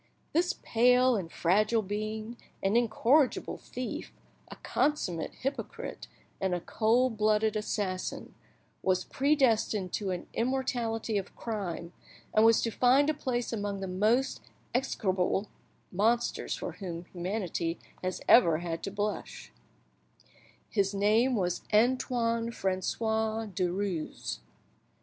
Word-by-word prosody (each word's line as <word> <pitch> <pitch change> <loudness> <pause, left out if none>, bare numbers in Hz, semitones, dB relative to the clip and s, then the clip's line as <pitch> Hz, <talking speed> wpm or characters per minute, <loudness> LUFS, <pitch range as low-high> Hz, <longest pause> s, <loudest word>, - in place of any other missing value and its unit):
This 350 +3 +2
pale 250 +2 +4
and 175 -6 -3
fragile 215 +6 +2
being, 215 +3 -4 0.3
an 195 +3 +2
incorrigible 240 +4 +2
thief, 250 -1 -6 0.4
a - - -9
consummate 185 - -1
hypocrite, 270 +2 -4 0.3
and 190 -2 0
a - - -2
cold 225 +5 +1
blooded 215 0 +2
assassin, 205 -3 -3 0.5
was 185 -1 +1
predestined 235 - +2
to 200 -2 -1
an 180 -1 -3
immortality 235 -4 -1
of 195 - -9
crime, 180 -6 -4 0.4
and 215 - +5
was 225 0 +5
to 230 - 0
find 265 +6 +4
a - - -3
place 250 -5 -2
among 205 -2 -2
the 195 - -4
most 215 +8 +1 0.3
execrable 195 -6 0 0.4
monsters 225 +6 +1
for - - -5
whom 175 -3 -6
humanity 175 -2 -2 0.3
has 185 0 -2
ever 170 -10 +7
had 165 0 -4
to - - -2
blush; 205 +1 -4 1.1
his 200 -1 0
name 220 +6 +3
was 180 -4 0
Antoine 230 0 +2
Francois 220 +3 -1
Derues. 185 -3 -2
215 Hz, 115 wpm, -30 LUFS, 190-240 Hz, 1.1 s, ever